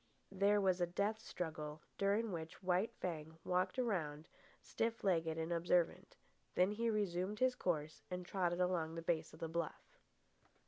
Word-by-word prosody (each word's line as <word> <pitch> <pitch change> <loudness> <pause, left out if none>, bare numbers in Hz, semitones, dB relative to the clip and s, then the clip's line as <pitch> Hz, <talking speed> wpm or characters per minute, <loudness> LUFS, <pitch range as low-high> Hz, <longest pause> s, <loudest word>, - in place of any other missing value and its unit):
There 200 +1 +4
was 185 -2 +3
a 175 - +3
death 200 +5 0
struggle, 155 -6 -5 0.2
during 205 +2 +2
which 165 +1 -6
White 185 +4 +2
Fang 160 -2 -4
walked 180 +5 +1
around, 165 -11 -1 0.3
stiff 230 0 -2
legged 165 -4 +2
and 165 +1 -1
observant. 170 0 +1 0.4
Then 185 +2 +4
he 230 +2 0
resumed 200 -2 0
his 255 +2 +4
course 155 -9 -1
and 180 -1 -4
trotted 175 -2 0
on 180 - +4
along 165 -2 -1
the 165 - -4
base 165 -1 0
of - - -12
the 165 - -2
bluff. 165 -1 -4
180 Hz, 165 wpm, -39 LUFS, 165-200 Hz, 0.4 s, There